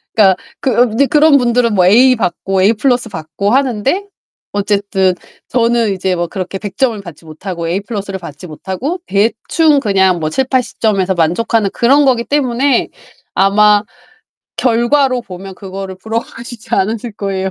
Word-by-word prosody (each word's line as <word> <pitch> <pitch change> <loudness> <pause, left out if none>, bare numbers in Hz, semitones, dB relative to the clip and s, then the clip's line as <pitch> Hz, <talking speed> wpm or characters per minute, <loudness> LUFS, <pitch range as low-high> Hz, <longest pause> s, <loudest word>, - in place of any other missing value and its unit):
그니까 195 -4 +5 0.2
그 265 - -1
으 240 -2 +3
이제 275 +5 +3
그런 300 0 +5
분들은 240 -2 +1
뭐 180 -2 +4
에이 250 +7 +5
받고 190 -2 -1
에이 205 +4 +4
플러스 245 0 0
받고 170 +4 -3
하는데 270 - 0 0.4
어쨌든 200 -2 0 0.3
저는 235 -3 +1
이제 185 0 -1
뭐 175 0 -2
그렇게 190 +1 -5
100 200 -1 -8
점을 240 -5 +1
받지 170 -3 -12
못하고 170 +2 -6
에이 180 +3 0
플러스 205 -2 -5
를 190 - -5
받지 170 0 -10
못하고 195 - -5
대충 235 - +2
그냥 190 -6 +2
뭐 155 - -2
70-80 260 - -1
점에서 195 -4 +1
만족하는 195 +5 +1
그런 275 +5 +3
거기 250 -3 +2
때문에 265 -1 +1 0.4
아마 205 +1 +4 0.7
결과로 250 +1 +1
보면 190 0 -9
그거를 190 0 -7
부러워하시지 230 +3 -5
않으실 220 +4 -1
거에요. 195 -2 -3
210 Hz, 335 characters per minute, -15 LUFS, 190-245 Hz, 0.7 s, 그니까